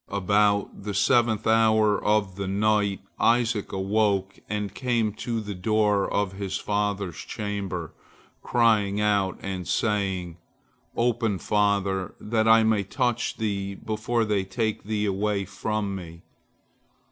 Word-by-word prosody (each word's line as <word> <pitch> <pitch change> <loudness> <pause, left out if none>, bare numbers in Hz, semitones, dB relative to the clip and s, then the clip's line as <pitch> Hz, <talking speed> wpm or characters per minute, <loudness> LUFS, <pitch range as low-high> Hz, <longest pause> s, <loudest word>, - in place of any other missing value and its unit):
About 100 +1 +1
the 100 0 -4
seventh 110 +1 +2
hour 110 -2 +3
of 105 -3 +1
the 100 0 -4
night, 100 0 +1 0.2
Isaac 115 -3 +2
awoke 95 0 0
and 105 -1 -3
came 120 -4 0
to 115 +1 -3
the 105 -2 -5
door 105 +1 +1
of 100 -2 0
his 95 -1 -3
father's 100 -4 -2
chamber, 100 -6 -4 0.5
crying 105 -4 +2
out 100 -3 +1
and 95 -3 -4
saying, 95 -5 -1 0.6
"Open, 115 -3 +1
father, 100 -2 0
that 110 0 0
I 115 0 +6
may 110 -2 +2
touch 120 +3 -1
thee 100 -2 -2
before 110 +3 -1
they 105 -3 0
take 110 +3 -2
thee 105 0 -1
away 100 0 0
from 105 0 -3
me." 85 -2 -9
105 Hz, 125 wpm, -25 LUFS, 100-110 Hz, 0.6 s, I